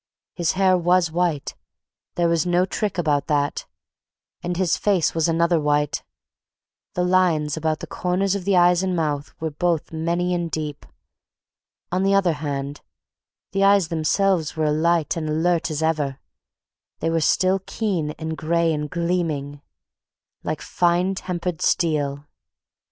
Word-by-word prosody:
His 175 -3 0
hair 190 -1 +3
was 175 -1 +2
white; 170 -4 -1 0.6
there 175 -1 +2
was 165 -2 +2
no 180 +1 +2
trick 205 0 -3
about 150 -4 +1
that; 145 -2 0 0.7
and 175 0 -3
his 185 -2 +2
face 195 -6 +1
was 165 0 +1
another 170 +1 +2
white. 150 0 +1 0.9
The 180 - +1
lines 175 -5 +2
about 160 -1 -1
the - - -4
corners 185 +2 -1
of 200 -2 -3
the 195 0 +2
eyes 175 0 +5
and 185 -1 -1
mouth 150 -3 -2
were 160 -1 -3
both 165 +1 -1
many 170 +3 0
and 170 -1 -1
deep. 150 -3 -5 1.0
On 180 +1 +1
the 195 +1 +3
other 185 -4 +3
hand, 145 -1 -4 0.7
the 195 +1 +1
eyes 195 -4 +4
themselves 165 +1 +1
were 155 - +1
alight 160 +1 +1
and 155 -2 -3
alert 165 +2 +1
as 155 0 -2
ever; 150 -4 0 0.8
they 165 - -1
were 165 0 +1
still 185 +4 +2
keen 185 -9 -1
and 160 0 -4
gray 165 +1 +1
and 150 -1 -3
gleaming, 165 -5 -2 0.8
like - - -3
finely 175 +2 +1
tempered 180 -3 -4
steel. 145 -4 0
170 Hz, 145 wpm, -23 LUFS, 155-180 Hz, 1.0 s, eyes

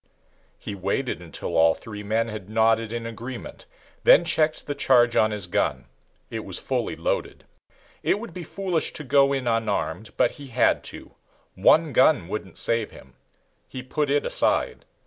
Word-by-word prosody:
He - - -7
waited 100 +4 -2
until 85 -2 -6
all 80 0 +5
three 105 -2 -9
men 110 +3 0
had 105 -3 -7
nodded 110 0 +2
in 115 0 -4
agreement, 115 +2 -8 0.4
then 175 - +7
checked 160 -1 +1
the 145 - -3
charge 120 -4 +3
on 110 - +4
his 105 -3 -3
gun 90 - -1 0.5
it - - -3
was - - -2
fully - - -2
loaded. - - -3 0.6
It - - +1
would 225 -6 -8
be 180 - -7
foolish 180 0 -2
to 150 - -5
go 140 +1 +4
in 135 -2 -1
unarmed, 110 -1 -1
but 120 - +3
he 140 -1 -11
had 125 - +2
to. - - -8 0.4
One 155 - +4
gun 130 - +4
wouldn't 95 -2 -6
save 115 -2 +1
him. 65 - -16 0.5
He 130 - -8
put 145 +3 -2
it 145 +1 +1
aside. - - 0
115 Hz, 165 wpm, -24 LUFS, 105-140 Hz, 0.6 s, then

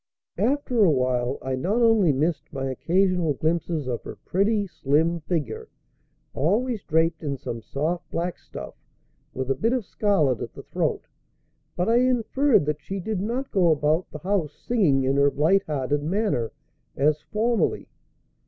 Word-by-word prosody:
After 255 -4 +2
a 190 - +6
while 125 -2 +1
I 130 - -2
not 185 - 0
only 225 -8 +4
missed 155 +4 -1
my 135 -2 -4
occasional 175 +1 +1
glimpses 160 -1 -1
of 120 -2 -2
her - - -8
pretty, 205 +2 +1
slim 165 0 +1
figure, 150 -8 -3 0.6
always 215 - 0
draped 160 0 +1
in 140 -3 -3
some 115 -2 -6
soft 155 +9 -3
black 175 +1 -3
stuff - - -9 0.6
with 130 0 -2
a - - +4
bit 230 - 0
of 250 -5 -1
scarlet 155 - +1
at - - -6
the - - -9
throat, - - -2 0.7
but 180 - 0
I 230 +1 +4
inferred 255 - +3
that 150 0 -2
she 195 +7 -5
did 210 +1 -3
not 245 +6 -3
go 180 -4 +3
about 155 +3 +1
the - - -7
house 175 -2 -1
singing 170 - +1
in 135 +1 +1
her 140 0 +5
light 160 +8 +2
hearted 145 -1 -1
manner, 170 - 0 0.5
as 150 +2 +2
formerly. 220 +1 0
165 Hz, 160 wpm, -25 LUFS, 145-205 Hz, 0.7 s, a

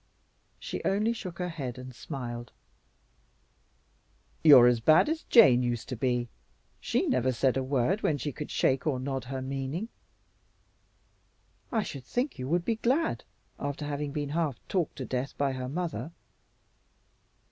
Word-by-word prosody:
She - - -5
only 210 +4 +1
shook 185 -7 -7
her 180 -1 -2
head 135 -8 -5
and 130 0 -9
smiled. 120 -2 -6 1.9
"You're 140 -6 +9
as 120 -1 +4
bad 155 - +5
as 320 0 -2
Jane 130 - +7
used 120 -2 -2
to 130 - -3
be. 125 0 0 0.5
She - - 0
never 130 +1 +1
said 130 +1 +1
a 135 - +1
word 135 - 0
when 150 - +1
she 145 +2 -3
could 150 +3 -7
shake 135 +3 +1
or 135 -4 +1
nod 135 -1 -3
her 130 +1 -4
meaning." 135 - -3 1.8
"I 225 -3 +1
should 135 -8 -7
think 245 - -2
you 130 - -4
would 170 +3 0
be 225 - 0
glad, 270 +9 0 0.3
after 145 +1 -4
having 145 0 -3
been 145 -1 -3
half 150 -4 -1
talked 180 -5 -1
to 130 - -5
death 130 +2 -3
by 140 -1 +1
her 130 -1 -4
mother." 165 +1 -3
140 Hz, 155 wpm, -29 LUFS, 130-170 Hz, 1.9 s, You're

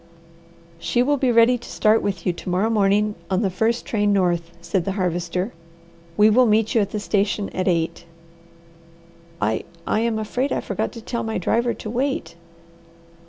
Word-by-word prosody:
"She 240 +8 +1
will 290 +2 +2
be 260 -2 +2
ready 235 +1 +5
to - - -12
start 215 +1 +3
with 200 -2 -3
you 180 - +1
to 175 - -7
morrow 190 +5 +1
morning, 210 0 +2 0.2
on 190 +2 +1
the 195 - 0
first 225 +6 0
train 205 -2 +1
north," 175 -4 +1
said 170 +1 -1
the 195 - -2
Harvester. 180 +1 -2 0.6
"We 210 - +6
will 240 +3 +5
meet 220 +1 +2
you 230 - +4
at 200 - -1
the 210 - -3
station 205 0 0
at 185 +1 -3
eight." 170 -1 0 1.3
"I 110 +1 0 0.2
I - - +1
am 230 -1 0
afraid 245 +5 -2
I - - 0
forgot - - -3
to 230 - -9
tell 235 +1 -3
my 225 -1 -2
driver 235 +1 0
to 215 - -7
wait." 245 -10 -2
210 Hz, 180 wpm, -22 LUFS, 185-230 Hz, 1.3 s, We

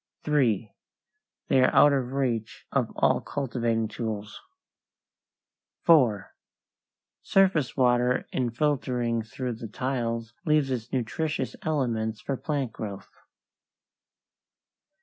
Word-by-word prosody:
3. 120 -8 +1 0.7
They 130 - +4
are 130 - +4
out 145 - +7
of 130 -2 -1
reach 120 -6 -2
of - - 0
all - - +2
cultivating 115 -4 -1
tools. 105 -2 -5 1.4
4. 125 - +4 0.9
Surface 185 -10 +2
water 125 -1 +3
in 125 -2 0
filtering 125 -3 0
through 120 +3 -4
the 115 0 -7
tiles 115 -1 -3
leaves 150 -5 +2
its 120 -2 -3
nutritious 150 +6 -2
elements 115 -8 -1
for 135 - -3
plant 140 -3 -2
growth. 100 -3 -7
125 Hz, 100 wpm, -27 LUFS, 115-140 Hz, 1.4 s, out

